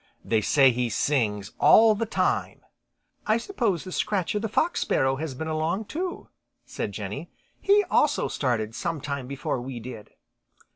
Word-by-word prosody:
They 110 Hz, -2 st, +2 dB
say 135 Hz, +4 st, +5 dB
he 125 Hz, 0 st, -1 dB
sings 105 Hz, -4 st, 0 dB
all 220 Hz, 0 st, +7 dB
the 220 Hz, +2 st, -2 dB
time." -, -, -1 dB, 0.7 s
"I 215 Hz, +1 st, +4 dB
suppose 230 Hz, -, -1 dB
Scratcher 200 Hz, 0 st, 0 dB
the 220 Hz, +1 st, -3 dB
Fox 325 Hz, +10 st, +1 dB
Sparrow 135 Hz, 0 st, +1 dB
has 150 Hz, -2 st, -4 dB
been 160 Hz, +4 st, -5 dB
along 160 Hz, +7 st, -1 dB
too," 350 Hz, -, -5 dB, 0.4 s
said -, -, -4 dB
Jenny. -, -, -6 dB, 0.3 s
"He 410 Hz, +1 st, +4 dB
also 305 Hz, -5 st, +2 dB
started 115 Hz, -5 st, -1 dB
sometime 140 Hz, -1 st, -4 dB
before 135 Hz, -2 st, -3 dB
we 125 Hz, -1 st, -6 dB
did." 115 Hz, -2 st, -9 dB
150 Hz, 145 wpm, -26 LUFS, -, 0.7 s, all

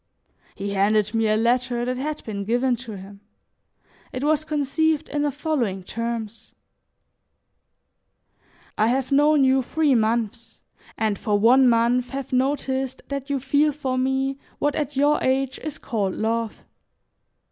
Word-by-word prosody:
He 200 Hz, 0 st, -4 dB
handed 210 Hz, +2 st, +2 dB
me 225 Hz, -1 st, +2 dB
a 215 Hz, 0 st, +2 dB
letter 240 Hz, +1 st, +1 dB
that 250 Hz, 0 st, -2 dB
had 300 Hz, +3 st, -4 dB
been 200 Hz, -3 st, -4 dB
given 245 Hz, +4 st, +1 dB
him. 205 Hz, -4 st, -10 dB, 0.9 s
It 255 Hz, 0 st, -4 dB
was 305 Hz, 0 st, +2 dB
conceived 310 Hz, +1 st, 0 dB
in 295 Hz, -, -1 dB
the 295 Hz, -, +1 dB
following 245 Hz, -, -2 dB
terms: 230 Hz, +1 st, -5 dB, 2.3 s
"I 215 Hz, -, +4 dB
have 260 Hz, +3 st, 0 dB
known 295 Hz, +1 st, +4 dB
you 265 Hz, 0 st, +4 dB
three 300 Hz, +2 st, +1 dB
months, 230 Hz, -1 st, -1 dB, 0.4 s
and 215 Hz, -2 st, 0 dB
for 210 Hz, -1 st, +1 dB
one 250 Hz, +5 st, +5 dB
month 240 Hz, +2 st, +2 dB
have 270 Hz, 0 st, -6 dB
noticed 265 Hz, 0 st, -1 dB
that 280 Hz, 0 st, -4 dB
you 280 Hz, -1 st, 0 dB
feel 285 Hz, +3 st, +2 dB
for 270 Hz, -3 st, -3 dB
me 265 Hz, +1 st, 0 dB, 0.2 s
what 290 Hz, 0 st, 0 dB
at 295 Hz, -1 st, -3 dB
your 290 Hz, +2 st, +3 dB
age 265 Hz, 0 st, 0 dB
is 310 Hz, -1 st, -6 dB
called 205 Hz, -6 st, -2 dB
love. 225 Hz, 0 st, -2 dB
255 Hz, 140 wpm, -23 LUFS, 225-280 Hz, 2.3 s, one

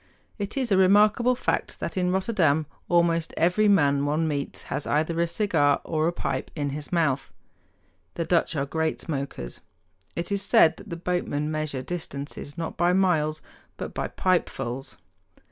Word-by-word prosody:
It 205 Hz, +5 st, -4 dB
is 255 Hz, -4 st, -1 dB
a 195 Hz, -, +5 dB
remarkable 210 Hz, +6 st, +5 dB
fact -, -, -2 dB
that -, -, -4 dB
in 180 Hz, -1 st, +1 dB
Rotterdam 180 Hz, -6 st, +2 dB, 0.2 s
almost 170 Hz, -1 st, +2 dB
every 180 Hz, +6 st, +3 dB
man 145 Hz, -8 st, +4 dB
one 155 Hz, +3 st, +1 dB
meets 145 Hz, -2 st, -3 dB
has 145 Hz, -, -4 dB
either 160 Hz, +3 st, +1 dB
a 170 Hz, -, +2 dB
cigar 165 Hz, -7 st, +2 dB
or 155 Hz, 0 st, 0 dB
a -, -, +2 dB
pipe 175 Hz, -, -3 dB
in 145 Hz, -3 st, -2 dB
his 145 Hz, +1 st, -6 dB
mouth. 140 Hz, -6 st, +1 dB, 0.8 s
The 170 Hz, -, -2 dB
Dutch 170 Hz, -1 st, +1 dB
are 140 Hz, -2 st, 0 dB
great 160 Hz, +2 st, -1 dB
smokers. 135 Hz, -, -5 dB, 0.6 s
It 170 Hz, +4 st, -3 dB
is 200 Hz, -1 st, +1 dB
said 165 Hz, -5 st, +5 dB
that -, -, -12 dB
the 170 Hz, -, -4 dB
boatmen 165 Hz, -4 st, -1 dB
measure 155 Hz, -4 st, -2 dB
distances 145 Hz, -2 st, -6 dB
not 165 Hz, -1 st, -4 dB
by 175 Hz, +1 st, +3 dB
miles, 160 Hz, -5 st, +1 dB, 0.3 s
but -, -, -6 dB
by -, -, -2 dB
pipefuls. 135 Hz, -8 st, -1 dB
165 Hz, 160 wpm, -26 LUFS, 145-180 Hz, 0.8 s, a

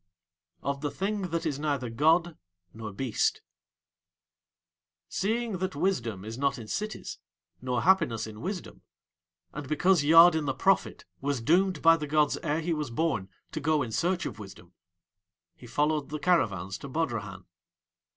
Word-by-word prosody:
OF 140 Hz, 0 st, -2 dB
THE 145 Hz, -, -1 dB
THING 195 Hz, +2 st, -2 dB
THAT 165 Hz, +1 st, -2 dB
IS 145 Hz, -3 st, -1 dB
NEITHER 140 Hz, -5 st, -2 dB
GOD 160 Hz, +6 st, +3 dB, 0.4 s
NOR 110 Hz, -1 st, -7 dB
BEAST 110 Hz, +3 st, -1 dB, 1.6 s
Seeing 220 Hz, 0 st, -1 dB
that 185 Hz, -5 st, -2 dB
wisdom 120 Hz, -, -1 dB
is 115 Hz, +3 st, -6 dB
not 140 Hz, -1 st, +1 dB
in 115 Hz, -3 st, -9 dB
cities 215 Hz, -, -4 dB, 0.4 s
nor 125 Hz, -1 st, -1 dB
happiness 145 Hz, -12 st, +3 dB
in 110 Hz, -1 st, -9 dB
wisdom, 185 Hz, +1 st, -5 dB, 0.7 s
and 145 Hz, -2 st, -7 dB
because 175 Hz, +1 st, +3 dB
Yadin 160 Hz, +1 st, +7 dB
the 135 Hz, -, -1 dB
prophet 195 Hz, 0 st, +1 dB
was 140 Hz, -1 st, -1 dB
doomed 175 Hz, +6 st, +2 dB
by 165 Hz, 0 st, +7 dB
the 150 Hz, -2 st, -5 dB
gods 150 Hz, 0 st, +2 dB
ere 150 Hz, +2 st, -1 dB
he 170 Hz, +1 st, -1 dB
was 150 Hz, -4 st, -3 dB
born 115 Hz, -7 st, -1 dB, 0.2 s
to 155 Hz, -, -4 dB
go 150 Hz, -1 st, +1 dB
in 115 Hz, -, -6 dB
search 175 Hz, +9 st, 0 dB
of 105 Hz, -, -6 dB
wisdom, 95 Hz, -3 st, -12 dB, 0.8 s
he 120 Hz, -, -13 dB
followed 150 Hz, +3 st, 0 dB
the 155 Hz, -, -3 dB
caravans 100 Hz, -, 0 dB
to -, -, -8 dB
Bodrahan. 130 Hz, -7 st, -3 dB
150 Hz, 150 wpm, -28 LUFS, 120-170 Hz, 1.6 s, Yadin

